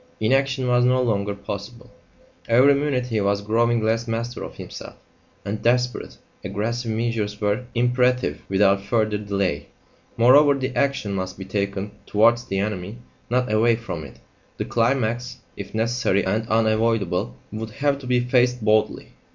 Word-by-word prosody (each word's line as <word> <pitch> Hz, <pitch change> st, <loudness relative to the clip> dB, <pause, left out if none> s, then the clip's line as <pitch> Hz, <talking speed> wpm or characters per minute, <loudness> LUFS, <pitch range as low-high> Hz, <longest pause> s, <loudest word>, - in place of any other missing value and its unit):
Inaction 130 Hz, +3 st, +1 dB
was 125 Hz, 0 st, +3 dB
no 125 Hz, +1 st, +3 dB
longer 105 Hz, -5 st, 0 dB
possible; 100 Hz, +4 st, -8 dB, 0.6 s
every 130 Hz, +5 st, +6 dB
minute 140 Hz, -3 st, 0 dB
he 115 Hz, -4 st, -1 dB
was 100 Hz, 0 st, 0 dB
growing 115 Hz, +2 st, +1 dB
less 115 Hz, +2 st, 0 dB
master 115 Hz, +2 st, -3 dB
of -, -, -8 dB
himself, -, -, -9 dB, 0.5 s
and 105 Hz, +1 st, -4 dB
desperate, 125 Hz, +1 st, 0 dB, 0.3 s
aggressive 115 Hz, +3 st, -3 dB
measures 110 Hz, -2 st, -2 dB
were 105 Hz, +4 st, -1 dB
imperative 125 Hz, -, +1 dB
without 100 Hz, 0 st, +3 dB
further 110 Hz, 0 st, 0 dB
delay. 100 Hz, -7 st, -2 dB, 0.5 s
Moreover, 140 Hz, +5 st, +6 dB
the 130 Hz, -1 st, -3 dB
action 140 Hz, -7 st, 0 dB
must 95 Hz, -1 st, -4 dB
be 95 Hz, -, -7 dB
taken 100 Hz, +1 st, -3 dB, 0.2 s
towards 115 Hz, +3 st, +3 dB
the 95 Hz, -, -3 dB
enemy, 100 Hz, +1 st, -3 dB, 0.3 s
not 125 Hz, -2 st, 0 dB
away 115 Hz, +2 st, +4 dB
from 110 Hz, -9 st, -6 dB
it; 70 Hz, -, -12 dB, 0.4 s
the -, -, -3 dB
climax, 120 Hz, 0 st, 0 dB, 0.2 s
if 100 Hz, +1 st, -8 dB
necessary 115 Hz, -3 st, +1 dB
and 110 Hz, +4 st, -1 dB
unavoidable, 110 Hz, -4 st, +1 dB, 0.2 s
would 110 Hz, +1 st, -5 dB
have 140 Hz, +5 st, -1 dB
to 130 Hz, -, -10 dB
be 125 Hz, -1 st, +2 dB
faced 125 Hz, -1 st, +1 dB
boldly. 110 Hz, 0 st, +1 dB
115 Hz, 150 wpm, -23 LUFS, 100-125 Hz, 0.6 s, every